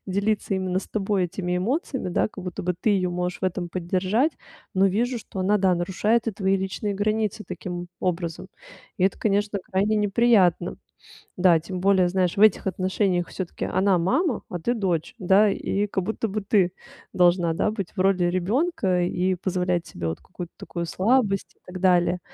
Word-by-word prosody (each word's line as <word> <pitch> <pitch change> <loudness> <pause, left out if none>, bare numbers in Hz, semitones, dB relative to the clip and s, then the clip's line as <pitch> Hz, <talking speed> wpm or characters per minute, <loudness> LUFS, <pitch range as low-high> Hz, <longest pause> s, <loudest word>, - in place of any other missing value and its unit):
делиться 200 +1 0
именно 185 -1 -1
с - - -7
тобой 200 -2 0
этими 180 0 -2
эмоциями, 260 - -2
да, 175 - +1
как 190 -3 -10
будто 180 -2 -5
бы 180 0 -1
ты 215 - +1
её 185 -3 +1
можешь 180 +1 -3
в - - -2
этом 180 -1 -2
поддержать, 185 - 0 0.4
но 190 +1 +4
вижу, 235 +6 0
что 200 - -10
она, 205 +3 +3
да, 190 -2 +3
нарушает 205 +7 0
и - - -2
твои 195 -1 +1
личные 190 +2 -3
границы 215 +1 -1
таким 175 -2 -6
образом. 170 -2 -2 0.5
И 185 - +3
это, 195 - +1
конечно, 205 0 0
крайне 200 +3 +1
неприятно. 205 -4 +3 0.6
Да, 175 -3 +5
тем 180 +3 -6
более, 190 -2 +4
знаешь, 185 +1 0
в - - +1
этих 215 -2 +5
отношениях 185 -1 0
всё-таки 185 -3 -5
она 190 -1 +2
мама, 235 - 0
а 175 - -4
ты 240 +8 0
дочь. 190 0 -1
Да? 200 +1 +4
И 200 +1 -1
как 190 -2 -2
будто 220 +4 -2
бы 210 +1 -3
ты 195 -3 +2 0.4
должна, 175 -2 +3
да, 190 +6 0
быть 200 -5 -5
в - - -7
роли 185 -1 +3
ребёнка 185 - +1
и 180 +1 0
позволять 180 -1 -1
себе 85 - -5
вот 80 - -3
какую-то 175 -1 -9
такую 170 -1 -5
слабость 195 +2 +1
и - - -38
так 180 0 -8
далее. 180 -1 +3
190 Hz, 185 wpm, -24 LUFS, 180-205 Hz, 0.6 s, Да